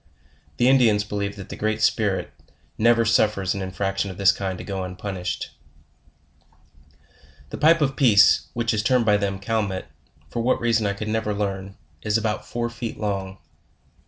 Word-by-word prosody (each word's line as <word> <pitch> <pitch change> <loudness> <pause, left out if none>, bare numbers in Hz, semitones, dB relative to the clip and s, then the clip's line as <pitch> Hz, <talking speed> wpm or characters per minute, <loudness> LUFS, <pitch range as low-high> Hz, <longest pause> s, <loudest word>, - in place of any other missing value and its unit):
The 120 - +3
Indians 120 -6 +4
believe 100 -1 -4
that 100 -3 -10
the - - -6
Great 110 0 -1
Spirit 105 -3 0 0.4
never 115 +1 +3
suffers 105 -3 +2
an 100 - -4
infraction 95 +1 -2
of 95 - -8
this 100 +1 +5
kind 95 -3 -4
to - - -8
go 100 -2 -4
unpun 95 +2 -5
ished 90 -1 -4 2.0
The - - -6
Pipe 165 +1 +5
of 135 -2 +1
peace, 105 -7 +5
which 115 -1 -1
is 105 - 0
termed 125 +1 +2
by 105 -1 +4
them 100 -1 -2
the 95 - -15
Calmet, 105 -4 -1 0.4
for 120 - -4
what 125 +2 +1
reason 115 -2 +1
I 100 - 0
could 110 +2 -5
never 110 -1 -1
learn, 100 -1 -4 0.2
is 105 +4 +1
about 110 -1 -3
four 120 0 -2
feet 120 -1 -6
long. 95 -2 -3
105 Hz, 175 wpm, -23 LUFS, 100-115 Hz, 2.0 s, this